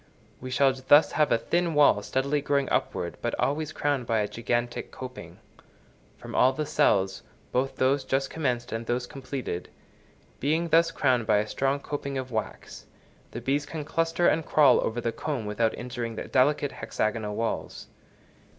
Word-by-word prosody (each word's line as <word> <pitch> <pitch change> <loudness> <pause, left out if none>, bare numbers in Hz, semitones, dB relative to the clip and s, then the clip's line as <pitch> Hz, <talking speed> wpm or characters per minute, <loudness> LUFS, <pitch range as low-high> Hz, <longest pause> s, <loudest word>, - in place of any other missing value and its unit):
We 130 - -7
shall 135 +1 +3
thus 135 +4 +5
have 150 -1 +2
a 115 - +5
thin 170 +6 0
wall 145 -8 +5
steadily 140 +6 -1
growing 140 -1 +1
upward - - -1
but - - -2
always 150 +2 0
crowned 145 -6 -1
by 115 - +1
a 105 - -1
gigantic 120 +2 -2
coping. 130 -1 -9 0.8
From - - -10
all 130 +1 +4
the 155 +3 -2
cells, 95 -10 +2 0.3
both 130 +2 0
those 135 +2 +2
just 135 0 -1
commenced 125 -6 -2
and 115 +1 -4
those 120 +1 -1
completed, 130 -9 -5 0.7
being 160 +5 0
thus 165 +1 +5
crowned 130 -8 +1
by 105 - +4
a 105 - +1
strong 135 +4 0
coping 140 -1 -4
of 130 -1 -5
wax, 110 -2 -5 0.4
the 120 - -7
bees 140 +4 0
can 155 -2 -5
cluster 165 +3 +1
and 160 - +2
crawl 145 -4 +5
over 115 +2 -2
the 115 - -1
comb 135 -3 -4
without 110 +2 0
injuring 120 -2 -5
the - - -4
delicate 140 +2 +2
hexagonal 110 -1 -2
walls. 115 +1 -3
130 Hz, 170 wpm, -27 LUFS, 120-145 Hz, 0.8 s, thus